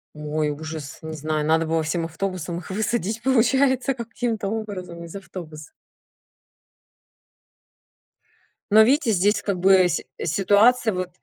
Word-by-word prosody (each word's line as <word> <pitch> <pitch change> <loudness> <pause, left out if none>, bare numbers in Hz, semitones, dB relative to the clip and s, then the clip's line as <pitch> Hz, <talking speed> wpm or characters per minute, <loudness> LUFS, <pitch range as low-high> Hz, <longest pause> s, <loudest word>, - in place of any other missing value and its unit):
Ой, 150 0 -2
ужас, 155 -1 -7
не 160 0 -6
знаю, 155 0 -2
надо 160 +1 +2
было 160 0 0
всем 165 +2 -2
автобусом 170 0 -4
их 175 - -9
высадить, 220 +1 -2
получается 265 +1 +2
каким-то 230 -3 -3
образом 185 -6 -6
из 165 - -11
автобуса. 160 -6 -9 3.0
Но 215 +1 +8
видите 255 +1 +3
здесь 205 +2 +2
как 200 -3 -2
бы 190 0 +5
сь - - -2 0.2
ситуация 210 +7 +3
вот 185 0 -3
185 Hz, 125 wpm, -23 LUFS, 160-220 Hz, 3.0 s, Но